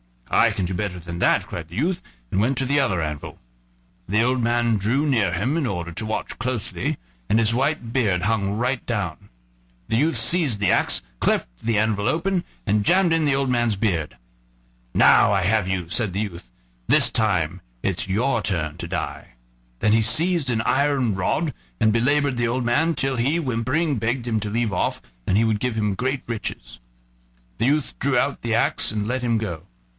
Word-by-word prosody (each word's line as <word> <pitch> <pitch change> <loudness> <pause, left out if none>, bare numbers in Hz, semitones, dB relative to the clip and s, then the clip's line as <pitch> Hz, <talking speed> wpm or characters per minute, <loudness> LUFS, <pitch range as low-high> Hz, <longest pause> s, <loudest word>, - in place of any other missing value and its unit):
"I - - +5
can 95 - -2
do 90 - -3
better 90 -1 -3
than 85 0 -7
that," - - +3
cried 85 -2 -7
the 85 - -11
youth, 170 - 0 0.3
and 95 - +1
went 125 +5 +1
to 135 - +1
the 140 +2 +2
other 95 -10 +1
anvil. 75 -2 -5 0.7
The 105 +4 +2
old 125 +1 +1
man 120 -1 +2
drew 120 +9 0
near 110 - +2
him 120 - 0
in 150 -6 0
order 85 -4 -4
to 90 +6 -5
watch 110 - -4
closely, 125 -3 -2 0.3
and 110 - +3
his 115 0 +4
white 135 -1 -1
beard 100 -9 +1
hung 100 -2 0
right 125 +2 -1
down. 100 -9 -4 0.6
The 115 - +1
youth 155 +6 +2
seized 155 - +3
the 100 - +3
axe, - - +2 0.2
cleft - - +1
the 115 -2 0
anvil 105 -1 +1
open, 180 +2 0 0.2
and 105 0 +1
jammed 180 -2 +4
in 165 -1 +2
the 140 -2 +3
old 135 -1 0
man's 120 -3 +1
beard. 90 - -1 0.8
"Now - - +5
I 95 -2 +1
have 105 +1 +2
you," 90 -3 -2
said 105 0 0
the 100 - -1
youth; 85 - -6 0.4
"this - - +5
time 95 -9 0 0.2
it's 95 -1 -1
your 115 +5 +1
turn 80 -6 -2
to 85 - -6
die." 90 -7 -5 0.5
Then 105 - +2
he 110 +1 +4
seized 165 +4 +2
an 115 -3 +1
iron 135 -2 +1
rod 95 -1 -1 0.3
and 110 - +4
belabored 140 +3 +2
the 120 -1 +1
old 125 +2 -1
man 160 +8 +2
till 135 -1 -1
he, 135 +8 +1
whimpering, 135 +2 0
begged 115 +3 -1
him 110 -2 0
to 105 0 -4
leave 115 -1 -1
off, 90 - -1 0.3
and 95 - +3
he 110 - +4
would 110 -2 +1
give 125 -1 -1
him 105 -2 0
great 130 +5 -2
riches. - - -5 0.8
The - - +2
youth 145 +2 0
drew 135 -2 +1
out 140 +3 0
the 115 -1 0
axe - - +1
and 105 -1 -2
let 125 +3 -2
him 120 -2 +1
go. 85 -8 -4
115 Hz, 200 wpm, -23 LUFS, 100-130 Hz, 0.8 s, I